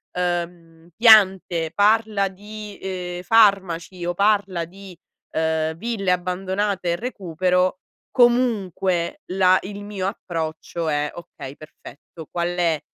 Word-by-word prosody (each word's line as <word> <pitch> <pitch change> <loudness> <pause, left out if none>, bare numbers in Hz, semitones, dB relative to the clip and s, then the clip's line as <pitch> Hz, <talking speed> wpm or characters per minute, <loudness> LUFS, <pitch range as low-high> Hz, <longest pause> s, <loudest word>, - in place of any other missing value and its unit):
uhm, 170 -2 -4
piante, 190 -7 +5
parla 210 0 +3
di, 210 +2 -10
uhm, 180 -2 -5
farmaci 190 -4 +2
o 175 - -1
parla 200 -3 +1
di, 190 +1 -13 0.4
uhm, 160 0 0
ville 200 -2 -1
abbandonate 185 +1 -1
e - - +1
recupero, 185 -4 -1 0.3
comunque 220 - +1
là 185 0 +4
il 205 +1 -7
mio 205 -2 -4
approccio 165 -2 -4
è: 150 0 0
"Okay, 140 -5 -10
perfetto, 155 +1 -13
qual 170 0 -1
è 175 -3 0
185 Hz, 110 wpm, -22 LUFS, 170-200 Hz, 0.4 s, piante